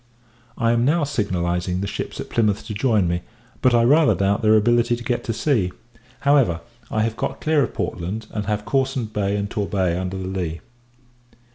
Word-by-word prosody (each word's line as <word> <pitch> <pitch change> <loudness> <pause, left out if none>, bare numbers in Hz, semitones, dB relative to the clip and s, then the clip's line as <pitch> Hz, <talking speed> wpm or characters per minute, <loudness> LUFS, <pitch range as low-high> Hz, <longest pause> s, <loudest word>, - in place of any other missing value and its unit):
I 115 0 +2
am 120 0 +2
now 150 +5 +2
signalizing 90 -9 -1
the 100 - -2
ships 100 - -5
at - - -6
Plymouth 105 -3 +1
to 110 - -5
join 105 -4 +2
me; 85 +1 -1 0.4
but, 125 -2 +4
I 115 - +5
rather 145 +6 +5
doubt 100 +1 +1
their 110 0 +5
ability 120 +2 +3
to 120 - -8
get 120 -1 -1
to - - -1
sea. 115 -6 +1 0.5
However, 135 - +3 0.3
I 110 - 0
have 115 0 -1
got - - -3
clear 155 -1 +2
of 125 - -2
Portland, 100 +6 -3
and 105 -2 -4
have 105 0 -1
Cawsand 130 -5 -1
Bay 100 -1 0
and 100 0 -2
Torbay 100 -4 -1
under 95 +1 -3
the 95 0 -4
lee. 90 -4 -3
105 Hz, 190 wpm, -22 LUFS, 95-120 Hz, 0.5 s, I